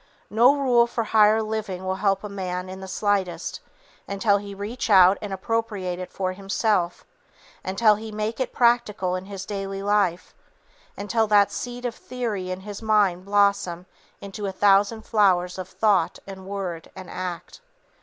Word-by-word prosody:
No 240 +6 +5
rule 245 -4 +3
for 235 -1 -2
higher 220 0 +4
living 215 -4 -4
will 190 0 -1
help 195 -1 +1
a - - -4
man 185 -2 -4
in 190 0 -8
the 190 - -7
slightest, 190 -4 -1 0.5
until 200 +1 +2
he 200 0 -8
reach 215 +5 -4
out 190 -1 +6
and 205 - -5
appropriate 195 -2 -2
it 185 - -7
for 185 -1 -2
himself, 195 -2 -1 0.6
until 210 +3 +3
he 220 +1 -6
make 215 +2 -3
it 260 - -1
practical 235 -6 +2
in 185 +1 -5
his 195 -1 -7
daily 195 -1 -5
life, 200 -4 0 0.6
until 220 +2 0
that 205 -1 +4
seed 245 0 -6
of 240 - -2
theory 225 -7 -4
in 185 +1 -4
his 205 +1 -8
mind 205 -5 +2
blossom 200 -3 +1 0.4
into 200 +1 -6
a - - -2
thousand 205 +3 +3
flowers 185 -5 +2
of 185 - -5
thought 185 -5 +1
and 190 -1 -10
word 190 -4 -5
and 185 -1 -9
act. 180 - -6
200 Hz, 165 wpm, -24 LUFS, 185-215 Hz, 0.6 s, out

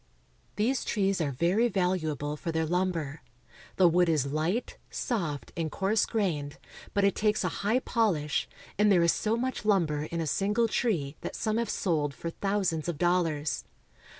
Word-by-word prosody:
These 240 +5 +1
trees 195 -4 0
are 150 - 0
very 175 - +2
valuable 165 - -1
for 165 +2 -4
their 160 0 0
lumber. 165 -4 -1 0.5
The 185 - +6
wood 175 +1 +3
is 150 -4 +2
light, 155 - -2
soft, 155 - -3
and 165 -2 -1
coarse 195 +3 +1
grained; 155 -10 -1 0.4
but 200 - +3
it 200 - +4
takes 210 -1 +1
a 180 - +1
high 215 +5 +2
polish, 180 - 0 0.3
and 210 0 +5
there 175 -3 +5
is 170 - +4
so 220 +2 0
much 255 0 -2
lumber 165 -8 +2
in 170 +1 -4
a 165 - -1
single 205 +9 +1
tree 165 - -1
that - - -5
some 215 0 -1
have 230 -2 -1
sold 150 -9 0
for 170 +6 -5
thousands 190 -5 -1
of 165 - -3
dollars. 165 -4 +1
180 Hz, 170 wpm, -29 LUFS, 155-210 Hz, 0.5 s, The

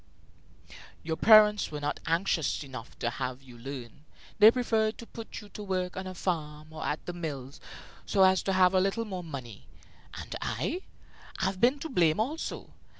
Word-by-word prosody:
"Your 160 0 -2
parents 210 +1 +6
were 150 - -5
not 145 0 -2
anxious 165 -3 +1
enough 130 -4 -9
to 120 - -1
have 130 +2 -4
you 125 -2 -14
learn. 125 +1 -8 0.4
They 215 0 +10
preferred 225 -3 +1
to 235 - -9
put 230 0 -8
you 210 - -13
to 210 - -9
work 185 -3 -2
on 190 0 -5
a 185 - -7
farm 155 -3 -3
or 155 - -6
at 150 - -2
the 175 - -4
mills, 145 -5 -6 0.5
so 195 - +4
as 190 0 +5
to 195 - -1
have 185 0 +5
a 185 - +5
little 195 +4 0
more 185 -4 -5
money. 130 - -8 0.5
And - - -7
I? 365 - -2 0.6
I've 190 -1 -1
been 255 +4 +4
to 320 - -4
blame 170 -7 +3
also. 290 +9 -3
180 Hz, 180 wpm, -29 LUFS, 150-210 Hz, 0.6 s, They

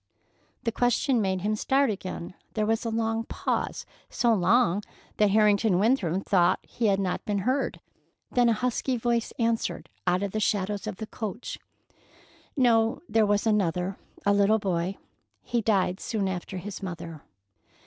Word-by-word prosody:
The 230 - 0
question 245 +1 +2
made 190 -2 0
him 210 +3 0
start 270 +3 +2
again. 185 -3 -6 0.2
There 215 -1 +1
was 225 +2 0
a 230 - -2
long 225 0 0
pause, - - -2 0.2
so 235 -1 +2
long 205 -1 +3 0.4
that 210 -1 +4
Harrington 210 -1 +4
Winthrop 195 -4 +1
thought 180 -2 +3
he 230 - -2
had 195 -1 +3
not 185 -2 -1
been 205 -1 -1
heard; 265 +2 0 0.5
then 245 -1 +4
a - - +4
husky 250 +3 -1
voice 235 -1 0
answered 230 -1 -1 0.2
out 180 +2 +2
of 200 - -2
the 215 - -1
shadows 205 0 -1
of 210 - -3
the 220 - -6
coach: 220 +1 -6 1.0
"No, 230 0 +3
there 220 -2 +3
was 205 +1 +1
another—a 195 -1 0
little 200 +2 +4
boy. 185 -2 -1 0.5
He 240 -1 0
died 195 -3 +1
soon 210 -4 -2
after 190 0 -4
his 200 +3 -6
mother." 170 -4 -6
210 Hz, 155 wpm, -27 LUFS, 190-230 Hz, 1.0 s, that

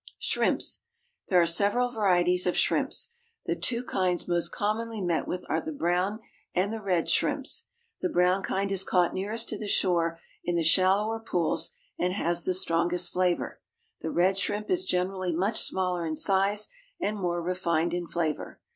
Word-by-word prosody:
=Shrimps.= - - 0 0.5
There 180 - +4
are 170 - +5
several 205 +9 +3
varieties 180 -5 +2
of 180 - +1
shrimps. 470 - +1 0.3
The - - 0
two 240 0 0
kinds 185 -6 0
most 175 -1 +1
commonly 220 +2 -2
met 175 -4 -1
with 180 - -4
are - - 0
the 315 - -5
brown 190 - 0 0.3
and 190 +4 +1
the 225 - -5
red 180 -5 0
shrimps. - - 0 0.4
The 180 - 0
brown 180 +2 +3
kind 195 +1 -1
is 195 -1 +2
caught 180 -2 +2
nearest 210 +4 -2
to 215 - -3
the 215 - -4
shore 170 -4 +1 0.2
in 175 - -1
the 170 - +1
shallower 195 +6 +4
pools, 180 -7 -1 0.3
and 180 +1 +1
has 175 -3 0
the 185 - +1
strongest 175 0 +1
flavour. 180 -1 0 0.4
The - - -3
red 185 +4 +2
shrimp 205 +2 -2
is 370 0 +1
generally 185 - -1
much 195 +6 +1
smaller 180 -2 0
in 155 - -2
size 200 +4 +3 0.3
and 210 - -1
more 175 -4 -2
refined 170 -2 0
in 175 -1 -2
flavour. 165 -3 -3
185 Hz, 170 wpm, -28 LUFS, 175-205 Hz, 0.5 s, are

